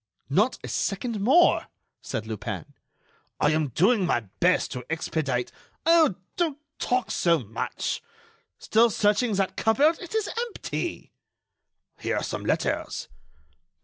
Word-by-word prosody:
"Not 210 - +3
a - - -5
second 215 +2 -2
more," 285 - +5 0.3
said 110 - -4
Lupin. 110 -2 -5 0.7
"I 150 - +3
am 155 -1 +1
doing 190 - +3
my 170 -9 +1 0.2
best 180 +1 +3
to 125 -1 -5
expedite——" 155 -6 -1 0.3
"Oh! 325 - +5 0.2
don't 325 -5 0 0.2
talk 250 0 0
so 170 -1 +3
much.... 100 - -3 0.6
Still 230 +2 +3
searching 210 +2 +2
that 190 -1 0
cupboard? 290 +9 +3
It 355 +4 -7
is 440 -2 +1 0.2
empty." 460 - -5 0.9
"Here - - -1
are - - -1
some - - -4
letters." - - -1
200 Hz, 125 wpm, -26 LUFS, 155-255 Hz, 0.9 s, more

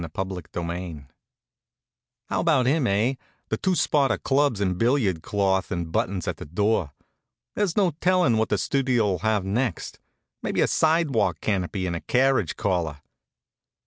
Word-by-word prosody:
CHAPTER 95 0 -3 0.4
IX 85 -3 -5 1.3
How - - 0
about 125 - +3
him, 140 0 +2
eh? 110 +6 +2 0.4
the - - -1
two 190 -1 0
spot 145 -5 +2
of - - -2
clubs 140 -5 +2
in 95 -2 +1
billiard 110 - +1
cloth 95 -1 0
and 85 -3 -3
buttons 90 +1 -1
at - - -2
the - - -8
door. 95 -1 0 0.6
There's 205 -4 -1
no 190 -4 +3
tellin' 180 -10 +3
what 110 - 0
the 105 - +1
Studio'll 120 -5 +1
have 110 -3 0
next 110 0 -2 0.4
maybe - - -1
a - - +5
sidewalk 160 -6 +2
canopy 95 -2 -1
and 85 -1 -2
a 85 - -4
carriage 135 +1 +1
caller. 85 -8 -1
105 Hz, 150 wpm, -25 LUFS, 95-135 Hz, 1.3 s, a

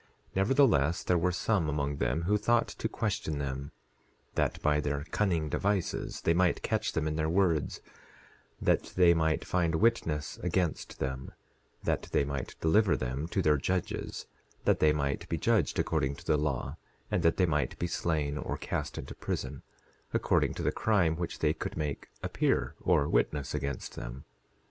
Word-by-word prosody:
10:13 - - -29
Nevertheless, 95 - +3
there 90 - +2
were 90 +2 +2
some 90 -3 +1
among 70 -1 -1
them 65 +7 0
who 100 +5 +2
thought 115 +3 +3
to 110 - -3
question 100 -9 -2
them, 70 0 -4 0.6
that - - 0
by 75 0 +3
their 70 -1 -1
cunning 85 -7 +1
devices 100 +4 -1
they 85 - +3
might 90 0 +2
catch 110 0 0
them 80 -1 0
in 75 0 -2
their 80 0 +1
words, 85 -5 +1 0.8
that - - +1
they 90 -2 +6
might 80 -1 +1
find 85 -3 +1
witness 80 -7 +1
against 90 -2 -1
them, 65 0 -4 0.5
that - - -1
they 70 - +3
might 70 -3 -4
deliver 100 +5 +4
them 65 +5 -3
to 95 +2 -1
their 75 -2 +4
judges 90 +6 -2 0.4
that - - +3
they 75 - +5
might 70 -2 -1
be 85 - 0
judged 105 -1 +2
according 65 +1 0
to 85 - -14
the 80 - +3
law, 70 -2 -1 0.3
and - - +2
that 80 0 +3
they 95 - +4
might 75 -4 0
be - - -1
slain 75 -4 -1
or - - -3
cast - - -3
into - - -6
prison, 65 0 -4 0.5
according - - +2
to - - -4
the - - +2
crime 90 -7 +2
which 85 0 -4
they - - +2
could - - -5
make 75 -2 -3 0.2
appear - - +1
or 70 - +2
witness 70 +3 0
against 70 -2 -3
them. - - -7
80 Hz, 170 wpm, -30 LUFS, 70-90 Hz, 0.8 s, they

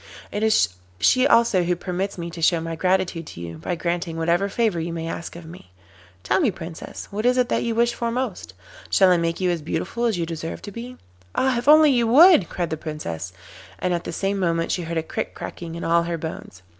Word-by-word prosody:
It 205 - -3
is 220 0 +3 0.3
she 255 +1 +4
also 230 -7 +4
who 175 0 +1
permits 185 +3 -3
me 170 -1 -5
to 165 - -8
show 170 +1 +3
my 165 0 -4
gratitude 180 -2 0
to - - -10
you 85 -1 -7
by 90 - -3
granting 170 -1 -2
whatever 170 +4 +1
favour 215 -4 0
you 165 +1 -3
may 165 -1 -4
ask 165 0 -6
of 170 -1 -10
me. 160 - -13 0.5
Tell - - +2
me, 300 -10 +3
Princess, 170 -4 -8
what 210 +2 -3
is 250 +1 +3
it 250 -1 +2
that - - +1
you 230 -1 -1
wish 235 +1 +2
for 235 - -2
most? 255 +3 -4 0.3
Shall 190 -2 +5
I 180 - +5
make 165 0 -1
you 185 -1 +1
as 170 -2 -2
beautiful 195 +9 -2
as 225 -5 +1
you 170 - -1
deserve 165 0 -6
to 205 - -7
be?' 245 +4 -8 0.4
'Ah, 265 -1 +2
if 240 - -7
you 300 - +10
only 295 -6 +5
would!' 270 - +6
cried 175 -3 -3
the 160 - -2
Princess, 95 - -5 0.5
and 180 -1 -1
at 170 - -2
the - - -4
same 195 +3 -1
moment 165 -2 0
she 180 - 0
heard 170 0 -4
a 160 - 0
crick - - -4
cracking 165 -1 -7
in 170 - -6
all 170 +1 +3
her 170 0 -3
bones. 155 - -8
175 Hz, 235 wpm, -23 LUFS, 165-225 Hz, 0.5 s, you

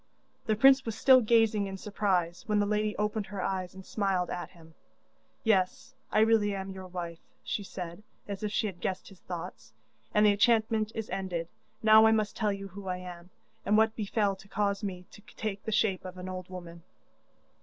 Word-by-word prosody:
The 215 - +3
prince 265 +4 +6
was 225 -3 -4
still 260 +1 +7
gazing 220 -3 +3
in 195 0 -6
surprise 185 -4 -1
when 210 -1 +2
the 205 - +2
lady 210 0 0
opened 210 0 -1
her 200 0 -6
eyes 185 -1 -2
and 190 0 -10
smiled 195 -4 -1
at 175 -2 -4
him. 165 -3 -17 0.7
'Yes, 225 +5 +1 0.2
I 215 - +4
really 220 -2 +3
am 195 0 -5
your 190 -1 -8
wife,' 170 -2 -7
she - - -2
said, 180 -2 -7 0.3
as 200 -2 -5
if 210 -1 -2
she 215 - 0
had 185 -4 -5
guessed 185 - -3
his 195 - -16
thoughts, 165 -10 -8 0.4
'and 210 0 +4
the 210 - +7
enchantment 220 0 +2
is 225 -1 -3
ended. 175 -3 -3 0.3
Now 220 0 +8
I 220 - +5
must 215 -2 0
tell 210 -2 +1
you 195 0 -5
who 195 +1 -9
I 180 -1 -1
am, 180 -1 -9 0.3
and 210 +2 +3
what 220 0 +3
befell 205 -2 0
to 195 - -16
cause 200 -1 -1
me 180 -3 -4
to - - -14
take 205 -3 -4
the 220 - -2
shape 200 -3 +1
of 185 0 -8
an 180 0 -7
old 185 -1 -6
woman. 175 -2 -9
200 Hz, 200 wpm, -30 LUFS, 185-215 Hz, 0.7 s, Now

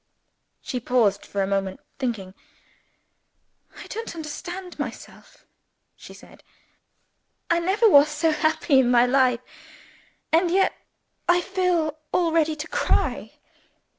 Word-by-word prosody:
She 250 - -3
paused 230 -5 +1
for 200 -1 -1
a - - 0
moment, 195 -1 -2 0.2
thinking. 220 -8 -3 1.4
"I - - -10
don't 450 -5 -6
understand 350 +4 -7
myself," - - -9 0.5
she - - -13
said. - - -16 1.1
"I 340 - +3
never 385 +7 +2
was 290 -6 +6
so 310 +2 +1
happy 315 -2 +2
in 250 -2 +3
my 245 0 +5
life. 250 -1 +2 0.9
And 340 +2 +3
yet 380 +2 +2 0.6
I 350 0 +5
feel 355 -5 -1
almost 335 -2 +1
ready 320 -1 +2
to 305 +1 -6
cry!" - - -1
310 Hz, 120 wpm, -24 LUFS, 250-350 Hz, 1.4 s, was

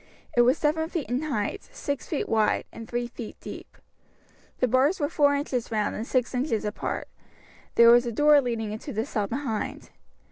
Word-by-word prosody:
It 240 - +6
was 250 +5 +4
seven 320 +2 0
feet 335 -5 -3
in 250 +3 +1
height, 265 -10 -3
six 285 - -4
feet 305 - -2
wide, 220 -2 +2
and 225 - -9
three 240 0 -2
feet 235 -2 -8
deep. - - -10 0.8
The 255 - +2
bars 265 +9 +3
were 290 -1 0
four 285 -3 +3
inches 265 -4 -2
round, 215 -2 -1
and 225 - -4
six 255 -1 0
inches 250 -4 -1
apart. 210 - -3 0.7
There 235 0 +8
was 240 +1 +5
a - - -1
door 295 +4 +5
leading 230 -4 -2
into 220 +6 -6
the 220 +2 -1
cell 210 -7 -2
behind. 235 -2 -4
245 Hz, 185 wpm, -26 LUFS, 225-285 Hz, 0.8 s, There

